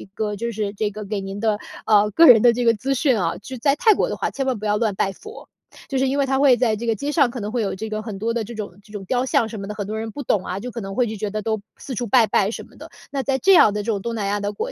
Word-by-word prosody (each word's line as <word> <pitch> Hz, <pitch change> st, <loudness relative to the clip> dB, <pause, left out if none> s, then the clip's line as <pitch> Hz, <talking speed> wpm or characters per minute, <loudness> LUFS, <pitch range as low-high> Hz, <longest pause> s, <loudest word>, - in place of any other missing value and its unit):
个 210 Hz, -1 st, -2 dB
就 235 Hz, +3 st, -3 dB
是 210 Hz, -2 st, -3 dB
这 210 Hz, +1 st, -1 dB
个 210 Hz, +1 st, -8 dB
给 200 Hz, 0 st, -3 dB
您 195 Hz, +1 st, -6 dB
的， 215 Hz, -1 st, 0 dB, 0.3 s
呃， 210 Hz, -1 st, +4 dB
个 330 Hz, +11 st, +6 dB
人 235 Hz, -7 st, +8 dB
的 240 Hz, -, +6 dB
这 245 Hz, +1 st, -1 dB
个 230 Hz, -, +5 dB
资 260 Hz, +6 st, -2 dB
讯 260 Hz, -4 st, +2 dB
啊。 170 Hz, -3 st, -1 dB
就 260 Hz, +6 st, -9 dB
在 275 Hz, +4 st, +2 dB
泰 435 Hz, +8 st, +5 dB
国 -, -, 0 dB
的 -, -, -4 dB
话， -, -, -1 dB
千 270 Hz, -, -3 dB
万 255 Hz, -3 st, 0 dB
不 215 Hz, -, -7 dB
要 210 Hz, 0 st, +1 dB
乱 215 Hz, -3 st, 0 dB
拜 195 Hz, -, 0 dB
佛。 435 Hz, -, -12 dB, 0.4 s
就 270 Hz, -, -1 dB
是 265 Hz, +1 st, +2 dB
因 270 Hz, +2 st, -1 dB
为 280 Hz, -, +3 dB
它 265 Hz, 0 st, +1 dB
会 275 Hz, -3 st, +6 dB
在 235 Hz, -3 st, +2 dB
这 225 Hz, +3 st, -6 dB
个 225 Hz, -, +3 dB
街 285 Hz, +8 st, -3 dB
上 285 Hz, -5 st, +3 dB
可 245 Hz, -, -6 dB
能 210 Hz, 0 st, -4 dB
会 240 Hz, 0 st, -1 dB
有 195 Hz, -, -2 dB
这 220 Hz, +3 st, -6 dB
个 215 Hz, 0 st, -3 dB
很 215 Hz, -3 st, -6 dB
多 225 Hz, +3 st, -1 dB
的 235 Hz, -1 st, -1 dB
这 225 Hz, +3 st, -8 dB
种 205 Hz, -3 st, -7 dB
这 215 Hz, -, -19 dB
种 200 Hz, -2 st, -6 dB
雕 250 Hz, +5 st, 0 dB
像 235 Hz, -3 st, +2 dB
什 220 Hz, -, -7 dB
么 195 Hz, -, -6 dB
的， 210 Hz, -, -5 dB
很 205 Hz, -, -4 dB
多 215 Hz, +1 st, -4 dB
人 225 Hz, 0 st, -4 dB
不 290 Hz, -, -7 dB
懂 205 Hz, -6 st, +1 dB
啊， 185 Hz, -, -4 dB
就 250 Hz, -, -6 dB
可 235 Hz, -, -6 dB
能 195 Hz, -1 st, -6 dB
会 250 Hz, -2 st, +2 dB
就 220 Hz, -, -5 dB
觉 210 Hz, 0 st, -3 dB
得 215 Hz, +1 st, -3 dB
都 220 Hz, 0 st, -1 dB, 0.2 s
四 260 Hz, -, -7 dB
处 245 Hz, -, -2 dB
拜 235 Hz, +2 st, +5 dB
拜 200 Hz, -1 st, +2 dB
什 -, -, -6 dB
么 -, -, -19 dB
的。 -, -, -11 dB, 0.2 s
那 275 Hz, -1 st, -1 dB
在 270 Hz, 0 st, 0 dB
这 390 Hz, +5 st, +5 dB
样 215 Hz, -, +6 dB
的 210 Hz, -, -2 dB
这 230 Hz, -, -1 dB
种 205 Hz, -, -1 dB
东 235 Hz, +3 st, -4 dB
南 210 Hz, -3 st, -2 dB
亚 205 Hz, +1 st, 0 dB
的 205 Hz, 0 st, -3 dB
国 480 Hz, -, -4 dB
220 Hz, 375 characters per minute, -22 LUFS, 205-250 Hz, 0.4 s, 人